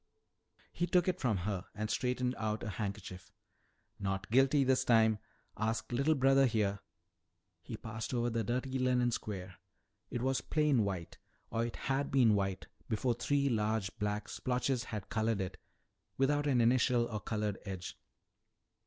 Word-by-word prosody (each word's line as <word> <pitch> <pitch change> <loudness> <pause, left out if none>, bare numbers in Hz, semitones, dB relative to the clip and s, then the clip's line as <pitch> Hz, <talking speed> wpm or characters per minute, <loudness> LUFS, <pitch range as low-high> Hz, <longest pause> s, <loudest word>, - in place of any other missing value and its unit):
He 175 - -1
took 180 0 +3
it 185 0 0
from 115 -6 +1
her 95 -3 -2
and 110 +1 -2
straightened 125 +2 0
out 110 0 -2
a 115 - -3
handkerchief. 95 -3 -5 0.7
"Not 95 +1 -3
guilty 135 +3 +5
this 130 0 +3
time. 110 -2 +4 0.4
Ask 110 +3 -1
little 140 +6 +2
brother 135 0 +5
here." 105 -4 0 0.8
He - - -7
passed 110 -1 -5
over 120 -1 0
the 115 0 0
dirty 130 +4 -1
linen 125 -1 +2
square. 95 -5 -5 0.5
It 120 - -3
was 135 0 +1
plain 150 -7 +2
white 95 -4 -4 0.3
or 115 - 0
it 120 - -7
had 135 +1 -1
been 125 -5 +5
white 95 -2 -1 0.2
before 120 +2 +1
three 140 +4 +1
large 110 -4 0
black 105 0 -1
splotches 125 0 -1
had 105 -4 -6
colored 110 -1 0
it 95 -1 -4 0.6
without 145 +2 +2
an 130 -4 +3
initial 120 0 +3
or 110 -2 -4
colored 105 -1 -2
edge. 95 -2 -6
115 Hz, 155 wpm, -33 LUFS, 105-130 Hz, 0.8 s, guilty